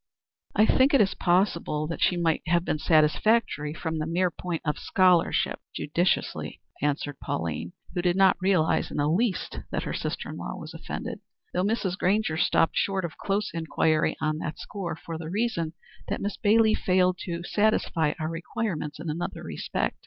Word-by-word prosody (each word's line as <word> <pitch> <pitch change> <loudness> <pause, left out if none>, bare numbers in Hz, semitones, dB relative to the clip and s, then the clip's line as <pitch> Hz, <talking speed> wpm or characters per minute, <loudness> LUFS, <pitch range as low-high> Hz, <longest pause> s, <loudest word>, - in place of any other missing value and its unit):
"I 215 - +6
think 265 +5 +4
it 210 -7 +3
possible 175 -4 +1
that 165 +2 -5
she 180 - +3
might 165 -2 +1
have 175 +1 +2
been 155 - -1
satisfactory 155 +1 +3
from 160 0 -3
the 155 - -2
mere 175 +2 +1
point 170 -1 -4
of 150 - -1
scholarship," 185 -3 +3 0.2
judicially 170 +5 -1 0.2
answered 145 0 -1
Pauline, 85 +1 -3 0.2
who 180 - 0
did 175 0 +2
not 190 -1 +5
realize 185 -4 +2
in - - -6
the 145 0 +2
least 195 +6 0
that - - -2
her - - -3
sister - - -3
in - - -6
law - - -5
was - - -8
offended, - - -5 0.3
"though 180 - +1
Mrs. 200 -3 -1
Grainger 195 -3 +2
stopped 170 -1 +2
short 195 -2 +1
of 165 - -8
close 200 +1 -1
inquiry 160 -1 +1
on 155 0 -1
that 155 -1 -4
score, 190 -6 -5
for 165 0 -7
the 160 -1 -6
reason 185 -5 -1 0.3
that - - -2
Miss 205 +1 -2
Bailey 220 +1 +4
failed 185 -2 +2
to 170 -1 -4
satisfy 175 -6 +1
our 155 - -1
requirements 165 -2 -3
in - - -6
another 160 +3 -3
respect. 65 -6 -2
175 Hz, 175 wpm, -27 LUFS, 155-195 Hz, 0.3 s, I